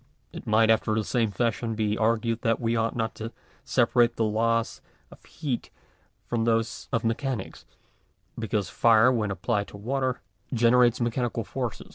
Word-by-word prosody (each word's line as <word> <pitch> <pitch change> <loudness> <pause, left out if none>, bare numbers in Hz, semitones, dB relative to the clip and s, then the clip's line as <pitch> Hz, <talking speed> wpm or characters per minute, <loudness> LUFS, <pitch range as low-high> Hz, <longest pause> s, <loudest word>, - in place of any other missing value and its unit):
It - - -9
might 110 +1 +4
after 110 -1 +2
the 110 - 0
same 115 0 0
fashion 115 +2 -1
be 105 -1 0
argued 115 +1 0
that 115 -1 +1
we 115 0 0
ought 115 0 0
not 115 -1 -1
to 115 +1 -5 0.3
separate 120 -1 +2
the 115 - 0
laws 115 +1 0 0.3
of - - -16
heat 140 -7 -4 0.6
from 115 -2 -1
those 115 -1 -1
of 115 - 0
mechanics, 115 -1 -3 0.7
because 105 -4 -2
fire 110 +9 +4
when 110 -4 0
applied 100 +3 -1
to - - -11
water 130 +4 -2 0.3
gene 120 -1 +3
rates 125 -1 +4
mechanical 120 0 -1
force. - - -4
115 Hz, 160 wpm, -26 LUFS, 110-120 Hz, 0.7 s, might